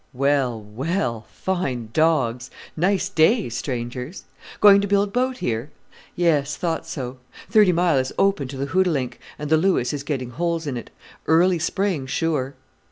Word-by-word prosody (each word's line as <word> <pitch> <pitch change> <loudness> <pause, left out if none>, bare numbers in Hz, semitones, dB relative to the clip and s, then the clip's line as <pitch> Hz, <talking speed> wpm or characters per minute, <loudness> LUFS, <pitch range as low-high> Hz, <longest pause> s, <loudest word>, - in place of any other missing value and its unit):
"Well! 135 -3 +1
well! 115 - -3
fine 135 -12 -3
dogs, 130 -6 +1 0.3
nice 190 +3 +1
day, 200 - +3
strangers. 125 - -5 0.4
Going 200 -1 +7
to 200 - -1
build 200 0 +1
boat 255 +1 0
here? 115 - -2 0.5
yes, 150 -4 +1
thought 165 -2 -2
so. 130 -2 -5 0.3
Thirty 210 -4 +6
Mile 170 -4 +2
is 130 0 -2
open 195 -9 +2
to 135 +1 -7
the 135 - -2
Hootalink, 155 -10 +1 0.2
and 150 0 -6
the 160 - +6
Lewis 160 -8 +1
is 145 - -3
getting 135 -4 -4
holes 170 +3 -2
in 140 -3 -3
it. 120 - -7 0.4
Early 170 +2 +4
spring, 165 -4 -1
sure!" 140 -2 -1
155 Hz, 155 wpm, -23 LUFS, 130-180 Hz, 0.5 s, Going